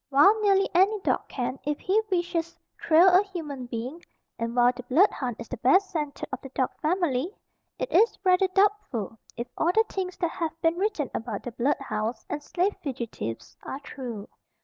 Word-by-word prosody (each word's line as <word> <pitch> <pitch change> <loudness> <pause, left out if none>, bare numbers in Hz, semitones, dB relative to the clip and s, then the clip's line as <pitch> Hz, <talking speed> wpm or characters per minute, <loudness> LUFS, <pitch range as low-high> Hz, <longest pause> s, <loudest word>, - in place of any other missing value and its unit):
While 345 +11 +5
nearly 395 -1 +4
any 390 +4 +4
dog - - 0
can, 255 +1 -3
if 295 +1 -2
he 410 +4 +2
wishes, 345 -2 -1 0.2
trail 330 +3 +6
a 365 +1 +7
human 310 -10 -6
being, 250 +8 -5 0.4
and 230 +1 -3
while 245 0 +5
the 250 - -6
blood 285 +11 +4
hound 245 -4 -3
is - - -8
the 255 - -5
best 375 - +3
scented 300 -5 -3
of 265 - -3
the 270 - -9
dog 260 0 -1
family, 335 0 0 0.4
it - - -3
is 460 - +4
rather 370 0 +4
doubtful 375 - 0 0.2
if 235 - -3
all 335 - +2
the 445 +4 +3
things 370 -2 -4
that 345 -3 -1
have 330 -1 -4
been 330 0 +2
written 385 - -1
about 225 -3 -4
the 245 - -5
blood 255 +5 +1
hounds 235 -3 -3
and 295 - -2
slave 365 +7 0
fugitives 235 - -5
are 270 - -6
true. 240 -8 -7
310 Hz, 190 wpm, -27 LUFS, 250-375 Hz, 0.4 s, a